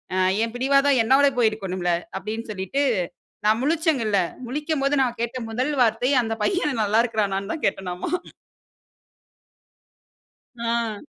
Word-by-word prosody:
அ - - 0 0.3
என் 230 0 -3
பிடிவாதம் 275 +1 +3
என்னோட 265 +5 +5
போயிருக்கணும்ல்ல. 190 -6 0 0.3
அப்பிடின்னு 220 +4 -5
சொல்லிட்டு 195 +7 -2 0.6
நான் 215 +1 +4
முழிச்சேன்ல 290 - +1 0.3
முழிக்கும்போது 290 +1 0
நான் 245 -2 0
கேட்ட 235 +2 -2
முதல் 255 +6 -1
வார்த்தை 235 +3 +2
அந்த 225 -1 -2
பையன் 300 - 0
நல்லா 210 +2 +2
இருக்குறானான்னு 205 -3 -1
தான் 315 - -7
கேட்டனாமா 180 -2 -2 2.5
ஆ. 230 -2 -1
230 Hz, 115 wpm, -23 LUFS, 215-275 Hz, 2.5 s, என்னோட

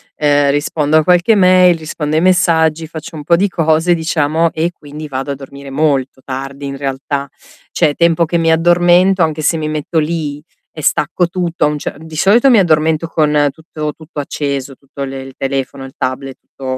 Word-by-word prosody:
ehm, 145 -1 +2
rispondo 145 +1 +1
a 155 - +4
qualche 180 +6 +3
mail, 185 -2 +5
rispondo 155 -1 -4
ai 160 - +2
messaggi, 165 -3 +2
faccio 160 0 -9
un 150 - -7
po' 170 +3 +3
di 195 +4 +1
cose 165 0 +2
diciamo 160 0 +1
e 165 +2 -1
quindi 150 -1 -10
vado 135 0 -4
a - - -3
dormire 140 0 -11
molto 135 -2 -1
tardi 135 +1 -6
in 140 - -5
realtà. 140 0 -3 0.4
Cioè, 145 - +2
tempo 170 0 +2
che 170 +1 -1
mi 165 0 +2
addormento, 175 +3 +4
anche 155 -1 0
se 165 - +2
mi 155 -1 -3
metto 155 +2 -1
lì 150 -2 -3 0.3
e 155 - -9
stacco 175 +4 +1
tutto, 175 -3 -1
a - - +3
un 150 0 -2
ce - - -5
di 160 +1 -11
solito 215 - +4
mi 230 - +6
addormento 160 -2 +2
con 150 -3 +2
tutto 155 0 -6
tutto 155 -1 -9
acceso, 140 -1 -3
tutto 140 +1 -9
le 135 0 -6
il 135 0 -11
telefono, 135 0 -3
il 135 +1 -10
tablet, 130 +1 -4
tutto, 130 -1 -6
155 Hz, 195 wpm, -15 LUFS, 140-170 Hz, 0.4 s, mi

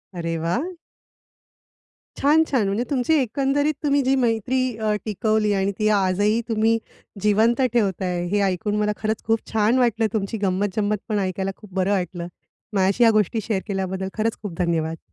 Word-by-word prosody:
अरे 165 -1 -2
वाह! 240 - -1 1.5
छान! 300 +3 +4
छान! 250 -7 +1
म्हणजे 200 +5 0
तुमची 275 +1 +1
एकंदरीत, 275 +5 0
तुम्ही 285 -1 +3
जी 265 +1 +2
मैत्री 245 0 +1 0.2
अ, 215 -1 0
टिकवली 215 0 +1
आणि 195 0 +1
ती 215 - +2
आजही 205 +4 +1
तुम्ही 225 +1 +2 0.4
जिवंत 220 +5 +3
ठेवताय, 185 -5 0
हे 205 - +2
ऐकून 190 +3 -1
मला 210 0 +1
खरंच 215 0 -2
खूप 225 0 +2
छान 220 +3 +2
वाटलं, 230 -2 +2
तुमची 215 0 -2
गंमत-जंमत 205 +2 0
पण 210 -1 +1
ऐकायला 190 0 -2
खूप 205 -4 -15
बरं 190 +1 +1
वाटलं. 180 -3 -2 0.5
माझ्याशी 195 +4 +2
या 230 - +7
गोष्टी 215 +1 +1
शेअर 205 -2 -2
केल्याबद्दल, 190 -1 -2
खरंच 220 +1 0
खूप 205 -5 -6
धन्यवाद. 165 -2 0
210 Hz, 160 wpm, -23 LUFS, 190-230 Hz, 1.5 s, या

